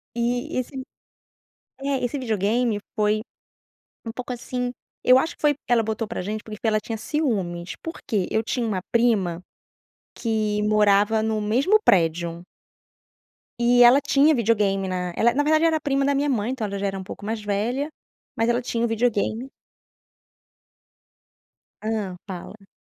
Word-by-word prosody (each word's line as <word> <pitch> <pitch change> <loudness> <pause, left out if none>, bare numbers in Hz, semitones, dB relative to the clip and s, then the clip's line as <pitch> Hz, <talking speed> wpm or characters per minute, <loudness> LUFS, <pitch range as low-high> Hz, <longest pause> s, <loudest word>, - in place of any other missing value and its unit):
E 240 +1 -1
esse 255 +2 -3 1.1
é, 275 -1 -1
esse 280 +4 -2
videogame 220 -1 0
foi 210 0 +1 0.9
um 225 - -4
pouco, 250 +1 -5
assim, 250 0 -3 0.3
eu 255 +1 +7
acho 320 - 0
que - - -26
foi 295 -2 +3
ela 235 -2 +4
botou 220 0 -2
pra - - -4
gente 210 +3 -4
porque 215 -1 -9
ela 215 -1 +3
tinha 225 +1 -5
ciúmes, 200 - -2
porque 225 - -3
eu 220 +1 +1
tinha 235 0 -1
uma 190 -4 -1
prima 205 -8 +2 0.8
que 215 -2 0
morava 210 +1 +3
no 220 -1 0
mesmo 265 - +3
prédio 170 -1 +2 1.2
e 245 +1 +4
ela 250 +4 +8
tinha 290 +2 +4
videogame 205 -5 +1
na 180 -1 -3
ela, 235 +1 +3
na 290 - +2
verdade, 310 +2 +3
era 315 -2 +2
prima 275 -1 +1
da 280 - +2
minha 285 +1 +1
mãe, 235 -1 0
então 235 -5 -3
ela 200 0 -4
já 200 - -2
era 195 -1 -2
um - - -6
pouco 200 - -9
mais 220 +1 -3
velha, 235 +9 -1 0.5
mas 225 +1 +1
ela 240 +1 +2
tinha 235 -1 -1
o - - +1
videogame 225 +2 0 2.3
Hã, 215 -4 -2
fala. 195 +2 -9
225 Hz, 155 wpm, -24 LUFS, 205-250 Hz, 2.3 s, ela